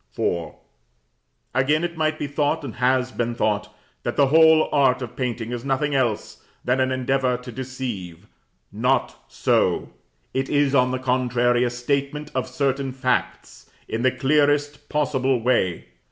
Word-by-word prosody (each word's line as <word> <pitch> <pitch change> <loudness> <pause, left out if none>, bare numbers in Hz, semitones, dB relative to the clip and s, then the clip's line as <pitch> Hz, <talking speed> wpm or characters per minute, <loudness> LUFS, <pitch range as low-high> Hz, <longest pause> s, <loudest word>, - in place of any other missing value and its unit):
IV. 85 -2 -1 1.0
Again, 150 +5 +2
it 170 -1 -3
might 155 -1 0
be - - -3
thought, 145 +1 -1
and 130 -6 -6
has 130 +1 +1
been 120 -1 -2
thought, 105 -2 -1 0.3
that - - -3
the 140 - +6
whole 160 +1 +6
art 130 -3 +3
of 120 0 -8
painting 120 -3 -3
is 120 -1 -4
nothing 140 +2 0
else 120 -6 -1 0.2
than 125 +2 +1
an 130 0 +1
endeavor 130 -1 0
to 125 0 -10
deceive. 115 -8 -6 0.5
Not - - 0
so: - - +1 0.4
it 135 0 -1
is, 145 -1 +2
on 125 -2 +4
the 130 - -1
contrary, 125 -1 +1
a 125 - +1
statement 140 +4 -2
of 130 0 -1
certain 135 +1 -1
facts, 130 -1 -2 0.2
in 115 - -3
the 130 - +4
clearest 145 +2 +1
possible 135 -4 +1
way. 115 -7 0
130 Hz, 155 wpm, -23 LUFS, 125-140 Hz, 1.0 s, the